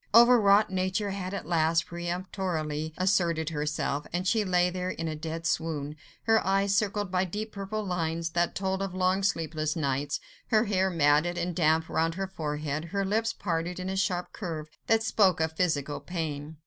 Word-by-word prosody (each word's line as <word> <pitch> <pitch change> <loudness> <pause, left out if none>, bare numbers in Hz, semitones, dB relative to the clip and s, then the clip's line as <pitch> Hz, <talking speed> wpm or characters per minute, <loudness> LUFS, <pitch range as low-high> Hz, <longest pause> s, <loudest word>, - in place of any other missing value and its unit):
Overwrought 215 -4 +7
nature 185 +2 0
had 190 -1 -4
at 200 - -4
last 165 0 +2
peremptorily 170 -3 -3
asserted 175 -4 +1
herself, 150 -1 -2
and 180 +2 -1
she 220 +2 +3
lay 180 -2 +2
there 180 0 -3
in 165 -2 -3
a 155 - -3
dead 165 +2 -5
swoon: 155 -3 -1 0.3
her 225 -1 +3
eyes 195 +1 +2
circled 205 -1 0
by 185 0 +2
deep 210 +4 -4
purple 205 +2 -4
lines, 165 -2 -1
that 170 +1 0
told 190 0 -1
of 195 -2 -3
long, 185 +1 +2
sleepless 155 -5 -1
nights, 140 -2 -1 0.3
her 220 0 +3
hair 190 -2 +2
matted 160 +1 +3
and 175 -1 -2
damp 160 -1 +3
round 165 +1 0
her 195 +1 -2
forehead, 150 -3 -3
her 195 +3 -2
lips 225 +4 +1
parted 175 -1 -3
in 185 +1 -3
a 190 - -2
sharp 180 -2 -1
curve 160 -6 -5 0.2
that 225 -1 +3
spoke 190 -5 +3
of 160 0 0
physical 150 -5 0
pain. 155 -3 -5
175 Hz, 175 wpm, -28 LUFS, 160-195 Hz, 0.3 s, Overwrought